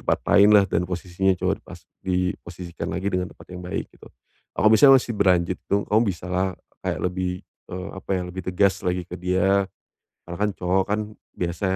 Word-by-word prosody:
tempat -, -, +1 dB
lainlah, 100 Hz, 0 st, +7 dB
dan 85 Hz, -, 0 dB
posisinya 90 Hz, +1 st, 0 dB
cowok 90 Hz, -, -2 dB
pas -, -, -11 dB, 0.2 s
diposisikan 90 Hz, -1 st, -3 dB
lagi 95 Hz, -, -2 dB
dengan 90 Hz, -2 st, -2 dB
tempat -, -, -17 dB
yang 90 Hz, 0 st, -8 dB
baik, 90 Hz, -, -4 dB
gitu. -, -, -17 dB, 0.5 s
Kalau 110 Hz, +3 st, +4 dB
misalnya 135 Hz, +5 st, +8 dB
masih -, -, -8 dB
berlanjut 90 Hz, -2 st, +2 dB
itu, 100 Hz, -, -1 dB
kamu 110 Hz, +2 st, +5 dB
bisalah 90 Hz, +2 st, -1 dB, 0.3 s
kayak -, -, -2 dB
lebih 90 Hz, 0 st, -2 dB, 0.2 s
eee, 90 Hz, +1 st, -6 dB
apa 95 Hz, -, -10 dB
ya? 90 Hz, -, -1 dB
Lebih 95 Hz, +1 st, -6 dB
tegas 95 Hz, +1 st, +2 dB
lagi 90 Hz, 0 st, 0 dB
ke 90 Hz, -, -7 dB
dia, 95 Hz, +2 st, +2 dB, 0.6 s
karena 85 Hz, 0 st, -6 dB
kan 105 Hz, 0 st, +2 dB
cowok 95 Hz, +1 st, +1 dB
kan 105 Hz, +1 st, +1 dB, 0.4 s
biasa 85 Hz, +2 st, -3 dB
90 Hz, 180 wpm, -24 LUFS, 90-95 Hz, 0.6 s, misalnya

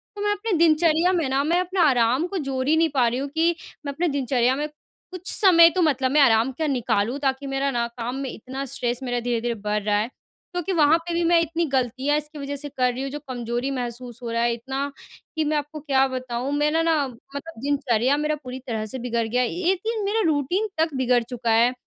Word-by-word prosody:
तो 410 Hz, -, -6 dB
मैं 415 Hz, 0 st, +1 dB
अपने 415 Hz, +2 st, -2 dB
दिनचर्या 325 Hz, +1 st, +4 dB
में 335 Hz, -6 st, +1 dB
ना, 270 Hz, +1 st, +1 dB
मैं 335 Hz, +4 st, +2 dB
अपने 365 Hz, +1 st, -2 dB
आराम 260 Hz, -2 st, +3 dB
को 385 Hz, -, -4 dB
जोड़ 270 Hz, -4 st, -2 dB
ही 310 Hz, -, +4 dB
नहीं 325 Hz, 0 st, +3 dB
पा 260 Hz, -5 st, +2 dB
रही 240 Hz, +2 st, -1 dB
हूँ 280 Hz, -, -3 dB
कि 335 Hz, +1 st, +3 dB, 0.3 s
मैं 280 Hz, -, -2 dB
अपने 340 Hz, +5 st, 0 dB
दिनचर्या 260 Hz, -3 st, +1 dB
में 295 Hz, +2 st, -2 dB, 0.4 s
कुछ 365 Hz, 0 st, -9 dB
समय 335 Hz, -5 st, +7 dB
तो 360 Hz, +2 st, -1 dB
मतलब 270 Hz, -5 st, +2 dB
मैं 295 Hz, +1 st, +5 dB
आराम 230 Hz, -1 st, +4 dB
का 315 Hz, -, +1 dB
निकालूँ, 245 Hz, -3 st, 0 dB
ताकि 275 Hz, 0 st, -1 dB
मेरा 270 Hz, 0 st, 0 dB
ना, 235 Hz, -2 st, 0 dB
काम 235 Hz, +1 st, -5 dB
में 270 Hz, -1 st, -4 dB
इतना 260 Hz, +4 st, -6 dB
स्ट्रेस 240 Hz, -2 st, -3 dB
मेरा 245 Hz, -1 st, -1 dB
धीरे-धीरे 240 Hz, 0 st, -1 dB
बढ़ 210 Hz, 0 st, -2 dB
रहा 205 Hz, 0 st, +2 dB
है, 215 Hz, -, -1 dB, 0.5 s
क्योंकि 355 Hz, +1 st, -2 dB
वहाँ 315 Hz, -1 st, +5 dB
पे 340 Hz, +1 st, -5 dB
भी 340 Hz, +1 st, +1 dB
मैं 335 Hz, 0 st, +4 dB
इतनी 335 Hz, +1 st, -1 dB
गलतियाँ 265 Hz, +1 st, 0 dB
इसकी 300 Hz, 0 st, -6 dB
वज़ह 280 Hz, 0 st, -4 dB
से 290 Hz, +1 st, -6 dB
कर 250 Hz, -2 st, 0 dB
रही 255 Hz, -, -5 dB
हूँ, 275 Hz, -, -3 dB
जो 295 Hz, -, -5 dB
कमज़ोरी 240 Hz, +1 st, -2 dB
महसूस 245 Hz, -2 st, -5 dB
हो 235 Hz, -, -4 dB
रहा 230 Hz, 0 st, 0 dB
है 235 Hz, 0 st, +2 dB
इतना, 270 Hz, +4 st, -4 dB, 0.4 s
कि 315 Hz, -, +1 dB
मैं 305 Hz, +1 st, +1 dB
आपको 295 Hz, +1 st, -5 dB
क्या 270 Hz, -2 st, +2 dB
बताऊँ। 255 Hz, 0 st, -4 dB
मेरा 300 Hz, +2 st, +2 dB
ना, 320 Hz, -4 st, +2 dB
मतलब 275 Hz, +4 st, -10 dB
दिनचर्या 270 Hz, -2 st, +1 dB
मेरा 300 Hz, +1 st, 0 dB
पूरी 255 Hz, 0 st, -6 dB
तरह 220 Hz, -3 st, -2 dB
से 260 Hz, -, -4 dB
बिगड़ 235 Hz, -2 st, -1 dB
गया 245 Hz, +3 st, +1 dB
है, 245 Hz, -, +1 dB, 0.2 s
एक 380 Hz, -, -1 dB
दिन 450 Hz, -2 st, -1 dB
मेरा 430 Hz, +3 st, +1 dB
रूटीन 315 Hz, +8 st, 0 dB
तक 320 Hz, -1 st, +1 dB
बिगड़ 250 Hz, -2 st, +2 dB
चुका 235 Hz, -1 st, -2 dB
है। 235 Hz, +3 st, +4 dB
275 Hz, 235 wpm, -24 LUFS, 245-315 Hz, 0.5 s, समय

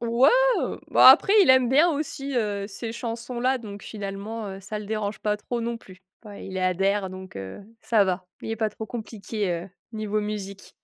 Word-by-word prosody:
Ouais, 235 Hz, +3 st, +4 dB, 0.3 s
heu, -, -, -3 dB
bah -, -, +8 dB
après 290 Hz, +9 st, +7 dB
il -, -, +2 dB
aime 260 Hz, -2 st, +5 dB
bien, 305 Hz, +7 st, +5 dB
heu, 285 Hz, -, -2 dB
aussi 280 Hz, -2 st, -4 dB, 0.3 s
ces 225 Hz, +3 st, -6 dB
chansons 235 Hz, +1 st, -5 dB
là. 260 Hz, +1 st, +2 dB
Donc 205 Hz, -4 st, -9 dB
finalement, 205 Hz, +1 st, -6 dB
heu, 195 Hz, 0 st, -8 dB
ça 210 Hz, +2 st, -5 dB
le 210 Hz, -, -7 dB
dérange 215 Hz, -1 st, -3 dB
pas 210 Hz, -1 st, 0 dB
trop 235 Hz, +3 st, -4 dB
non 230 Hz, 0 st, -3 dB
plus. 185 Hz, -2 st, -16 dB, 0.2 s
Ouais, 205 Hz, -2 st, -9 dB
il 190 Hz, -, -8 dB
y 190 Hz, -, -3 dB
adhère 190 Hz, +2 st, +1 dB
donc 185 Hz, -, -10 dB
heu, 95 Hz, -, -7 dB, 0.2 s
ça 220 Hz, -4 st, +3 dB
va. 185 Hz, -1 st, -2 dB, 0.2 s
Il -, -, -5 dB
est 225 Hz, -, -2 dB
pas 220 Hz, 0 st, 0 dB
trop 220 Hz, +1 st, -7 dB
compliqué, 215 Hz, -3 st, -4 dB
heu, 175 Hz, +2 st, -4 dB, 0.2 s
niveau 215 Hz, -1 st, -2 dB
musique. 200 Hz, -2 st, -6 dB
215 Hz, 210 wpm, -25 LUFS, 195-235 Hz, 0.3 s, bah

